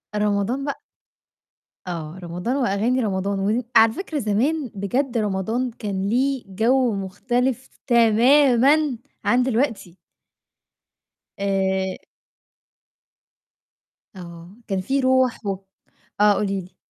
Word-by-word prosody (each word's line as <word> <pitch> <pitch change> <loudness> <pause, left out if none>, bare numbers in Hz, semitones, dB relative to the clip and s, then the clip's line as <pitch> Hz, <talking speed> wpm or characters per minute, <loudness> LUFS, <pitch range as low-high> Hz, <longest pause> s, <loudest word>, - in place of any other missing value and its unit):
رمضان 210 +6 0
بق 285 - -4 1.1
آه، 165 0 -6
رمضان 180 +9 -3
وأغاني 240 0 +1
رمضان 195 -2 -1
ودي 220 +5 0
على 225 0 +6
فكرة 320 -3 -4
زمان 250 +5 0
بجد 240 +6 -1
رمضان 220 +4 -1
كان 200 -3 -4
ليه 265 +2 0
جَوّ 230 +4 +1
مختلف 240 +7 -2 0.2
تمامًا 255 +4 +4 0.3
عن 245 +1 +3
دلوقتي. 230 -8 -1 1.4
آآ 190 -1 0 2.2
آه، 170 +1 -11
كان 195 -2 -1
في 270 +8 -1
رُوح 260 -3 +1
و 195 -1 -1 0.6
آه، 210 0 +6
قولي 195 -1 -1
لي. 180 0 -14
220 Hz, 100 wpm, -22 LUFS, 195-255 Hz, 2.2 s, على